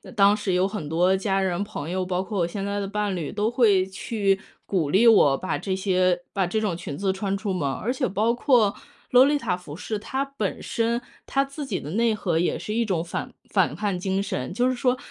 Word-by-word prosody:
当 200 +1 +5
时 200 -3 -1
有 185 +2 +3
很 200 -8 -5
多 180 +4 +2
家 195 0 0
人 185 0 0
朋 185 -7 -6
友， 185 0 -1
包 180 0 -1
括 200 0 -4
我 170 - +2
现 195 +3 -5
在 200 +1 -2
的 200 - -3
伴 205 -1 -1
侣， 160 -5 -4
都 210 +2 0
会 210 -6 +4
去 195 0 0 0.3
鼓 165 -7 0
励 220 +5 +5
我 145 -11 +6
把 185 - -2
这 190 -2 -2
些 185 -2 +1
把 195 -2 0
这 215 +5 -1
种 185 -6 -1
裙 170 -5 -6
子 195 +2 0
穿 195 +1 -2
出 200 0 -3
门 175 -7 -1
儿。 135 - -1
而 240 - 0
且 255 0 -1
包 220 +4 +1
括 240 -5 +3 0.3
洛丽塔 255 -7 +4
服 160 -5 -10
饰， 215 +5 -4
它 265 +6 -2
本 275 -8 -4
身 230 +1 -1 0.2
它 275 0 +1
自 275 +1 -7
己 210 -8 -2
的 145 - -7
内 230 +4 +2
核 180 -6 -1
也 175 - +1
是 210 - -4
一 235 - +2
种 185 -6 -1
反 170 - -5 0.2
反 - - +2
叛 205 -3 -1
精 190 +2 -1
神， 130 -10 -3
就 245 +5 +2
是 255 - +1
说 250 +1 +1
200 Hz, 260 characters per minute, -25 LUFS, 185-225 Hz, 0.3 s, 我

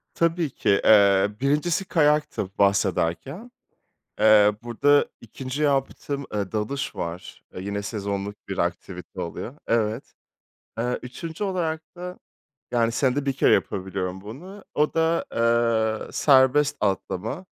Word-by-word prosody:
Tabii 165 -2 +1
ki. 100 -5 +1
Eee, 100 -2 +6
1'incisi 150 +7 +1
kayaktı 150 - +1
bahsederken. 100 - 0 0.7
Eee, 105 -1 +6
burada 145 +5 +3 0.2
2'nci 130 +5 -5
yaptığım, 140 0 -1
eee, 100 -3 -2
dalış 110 +6 -3
var. 85 +2 -6
Eee, 90 - -5
yine 100 +1 -3
sezonluk 100 -1 -4
bir 95 - -5
aktivite 90 +2 -4
oluyor. 115 - -6
Evet. 115 +1 -1 0.7
Eee, 125 +2 -1
3’üncü 160 +9 -6
olarak 165 -5 -2
da, 180 +1 -7 0.5
yani, 115 -1 +2
senede 135 +3 0
1 135 - +1
kere 135 - +4
yapabiliyorum 95 -1 -2
bunu. 175 - -10
O 150 +1 +1
da, 165 +1 +1
eee, 115 -1 +1
serbest 140 +1 +4
atlama. 105 - -2
115 Hz, 120 wpm, -24 LUFS, 100-150 Hz, 0.7 s, Eee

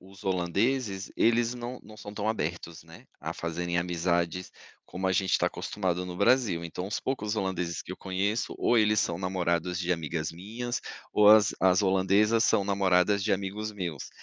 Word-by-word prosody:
os 95 +1 -15
holandeses, 95 +4 0
eles 120 +1 +2
não 120 +1 -6
não 110 - -13
são 105 -1 -9
tão 105 0 -3
abertos, 85 -5 -3
né, - - -15 0.2
a - - -4
fazerem 85 +1 -3
amizades 85 +1 -1 0.4
como 95 +1 -4
a 95 - +2
gente 95 0 +1
está 90 - +3
acostumado 90 -3 -2
no 90 -1 -6
Brasil, 100 -6 +2
então 90 +2 -5
os 105 - -3
poucos 110 -5 -2
holandeses 90 -4 -2
que 95 - -7
eu - - -8
conheço 100 +4 -1
ou 120 - +3
eles 105 -1 +3
são 85 0 -1
namorados 90 -1 -1
de 90 0 0
amigas 80 -1 -3
minhas 115 +8 -5 0.3
ou 105 -1 +6
as 110 0 +7
as 95 +1 +4
holandesas 100 +4 +3
são 100 - +3
namoradas 100 0 +2
de 105 - -1
amigos 100 +2 -3
meus, 85 -8 -5
95 Hz, 175 wpm, -28 LUFS, 90-105 Hz, 0.4 s, as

